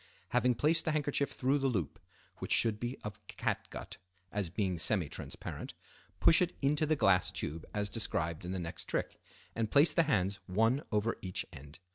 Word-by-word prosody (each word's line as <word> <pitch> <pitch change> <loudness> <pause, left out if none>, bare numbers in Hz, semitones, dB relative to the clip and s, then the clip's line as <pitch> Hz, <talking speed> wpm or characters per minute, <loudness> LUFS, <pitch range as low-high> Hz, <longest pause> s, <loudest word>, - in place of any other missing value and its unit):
Having 125 -1 +2
placed 155 +7 +2
the 160 - +1
handkerchief 145 -2 0
through 135 +3 +1
the 135 - +1
loop, 95 - -2 0.4
which - - -6
should 110 -2 +3
be 120 +3 -3
of 105 -2 -6
catgut, - - -4 0.3
as 100 -4 -2
being 90 -1 -1
semi 90 0 +4
transparent, - - -7 0.4
push 165 - +6
it 180 0 0
into 150 +2 +2
the 155 - +3
glass 95 - +3
tube 80 +2 -4
as 105 -1 0
described 85 -7 -1
in 90 - -4
the 95 - -2
next 85 -1 -5
trick, - - -3 0.3
and 115 -1 -1
place 145 +6 +5
the - - +5
hands 100 -5 +1
one 115 +8 +2
over 105 +1 0
each 90 -1 -3
end. 70 +3 -11
105 Hz, 180 wpm, -33 LUFS, 90-140 Hz, 0.4 s, push